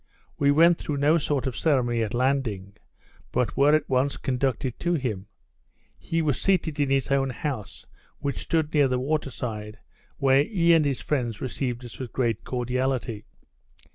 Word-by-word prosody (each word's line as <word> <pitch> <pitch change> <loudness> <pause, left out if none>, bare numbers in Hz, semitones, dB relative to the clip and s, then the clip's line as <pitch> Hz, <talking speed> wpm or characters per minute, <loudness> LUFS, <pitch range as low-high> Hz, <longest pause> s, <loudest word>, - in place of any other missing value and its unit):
We 140 - +3
went 165 +4 +5
through 150 - -3
no 150 +4 +3
sort 145 -2 -1
of 130 -3 -2
ceremony 125 -7 +1
at 110 +1 -2
landing, 120 -7 -1 0.6
but 125 -2 0
were 145 +2 +5
at 155 - 0
once 130 +2 +1
conducted 130 -1 -1
to 175 0 +1
him. 110 - -3 0.7
He 165 0 -1
was 145 -5 0
seated 165 -6 +1
in 145 -2 +2
his 135 0 +1
own 135 -1 +2
house, 125 -4 -5 0.3
which 140 -1 -3
stood 160 -2 -1
near 145 -3 +4
the 125 -1 0
water 145 +2 -1
side, 110 -4 -6 0.4
where 135 0 +4
he 170 -2 +3
and 160 -2 +4
his 135 -6 -1
friends 120 -5 -2
received 125 -1 -3
us 120 - -10
with 125 -4 -6
great 115 -7 0
cordiality. 125 -3 -2
135 Hz, 170 wpm, -25 LUFS, 120-145 Hz, 0.7 s, went